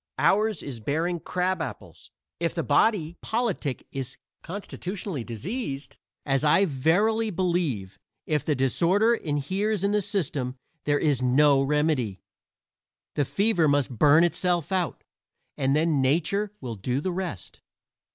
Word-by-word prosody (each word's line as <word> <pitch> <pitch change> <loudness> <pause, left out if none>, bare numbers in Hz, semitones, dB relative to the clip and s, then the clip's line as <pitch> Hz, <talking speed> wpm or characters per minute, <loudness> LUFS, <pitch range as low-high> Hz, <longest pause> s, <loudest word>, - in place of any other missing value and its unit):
Ours 210 -2 +2
is 130 -5 -6
bearing 165 +9 -1
crab 185 +3 -1
apples. - - -8 0.3
If - - -1
the - - -1
body 175 -7 +2
politic 220 - -2
is 135 +1 -5 0.2
constitutionally 185 - -5
diseased, 140 - -5 0.3
as 135 0 +1
I 155 +6 +5
verily 200 +10 +2
believe; 165 - -1 0.3
if 150 -3 0
the 150 - 0
disorder 175 - +3
inheres 190 +4 -1
in 200 - +2
the 210 0 +2
system; 140 -10 -2 0.3
there 145 0 +2
is 145 -4 +1
no 135 +2 +4
remedy. 135 - 0 0.9
The 145 - +1
fever 195 - +2
must 140 -2 +2
burn 150 +3 +6
itself 175 -1 +1
out, 185 -3 -1 0.5
and 135 0 +1
then 155 -2 +2
Nature 175 +9 +1
will 125 -3 -4
do 125 +6 -2
the 185 +5 -2
rest. 175 - -5
155 Hz, 130 wpm, -26 LUFS, 135-190 Hz, 0.9 s, burn